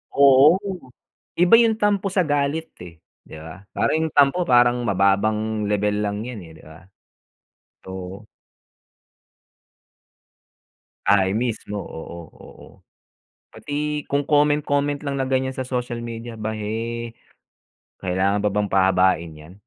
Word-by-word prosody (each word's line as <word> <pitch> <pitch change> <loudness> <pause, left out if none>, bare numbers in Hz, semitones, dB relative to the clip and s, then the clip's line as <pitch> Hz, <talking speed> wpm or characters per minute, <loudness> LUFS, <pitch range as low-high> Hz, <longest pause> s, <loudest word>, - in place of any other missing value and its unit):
Oo. 140 +3 +6 0.8
Iba 180 +5 +6
yung 230 -2 +3
tampo 205 -2 +1
sa 185 -1 +1
galit 145 +2 -1
eh, 85 -2 -11 0.3
di - - -11
ba? 80 +4 -11
Parang - - +1
yung 155 - -11
tampo 145 +5 +4
parang 120 0 +4
mababang 105 +2 +1
lebel 105 0 0
lang 105 +1 -3
yan, 125 -3 -7
eh, 80 - -13
di - - -18
ba? 80 +3 -14 1.1
Oo. 95 +2 -8 2.8
Ay 95 -1 +3
mismo, 115 -3 -3
oo, 85 -3 -8
oo. - - -15 0.8
Pati 150 0 -4
kung 140 +1 0
comment, 150 0 +3
comment 145 0 -1
lang 140 -2 -3
na 135 - -1
ganyan 130 0 -1
sa 130 - -4
social 125 -2 -3
media 115 0 -7
ba, 110 0 -4
eh, 115 +2 -4 0.9
kailangan 95 +2 0
pa 105 - +2
bang 105 0 -1
pahabain 95 -3 +2
'yan, 75 +2 -14
115 Hz, 130 wpm, -22 LUFS, 100-140 Hz, 2.8 s, Oo